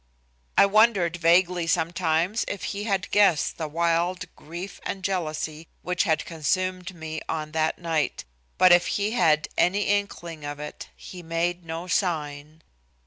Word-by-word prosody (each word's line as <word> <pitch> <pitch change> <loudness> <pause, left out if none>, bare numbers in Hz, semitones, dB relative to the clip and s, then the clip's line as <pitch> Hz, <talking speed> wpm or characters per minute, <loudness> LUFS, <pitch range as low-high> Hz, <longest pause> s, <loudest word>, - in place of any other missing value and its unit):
I - - +8
wondered 200 -4 +3
vaguely 175 0 +3
sometimes 170 +4 +1
if 200 - -5
he 205 0 -4
had 195 -4 -1
guessed 195 -8 +3
the 160 - -2
wild 170 +3 0
grief 175 +5 -8
and 190 - -5
jealousy 160 -4 -3 0.2
which 180 +2 0
had 160 -4 +1
consumed 185 +3 -2
me 160 -1 -6
on 155 -1 -3
that 160 0 0
night, 165 -3 -2 0.3
but 185 - +6
if 175 0 +6
he 205 +1 0
had 155 -9 +3
any 195 +4 +3
inkling 175 -6 -2
of 145 0 -5
it 150 - -8
he 180 - -10
made 170 +1 -2
no 165 +1 -5
sign. 155 -4 -2
170 Hz, 145 wpm, -25 LUFS, 160-185 Hz, 0.3 s, I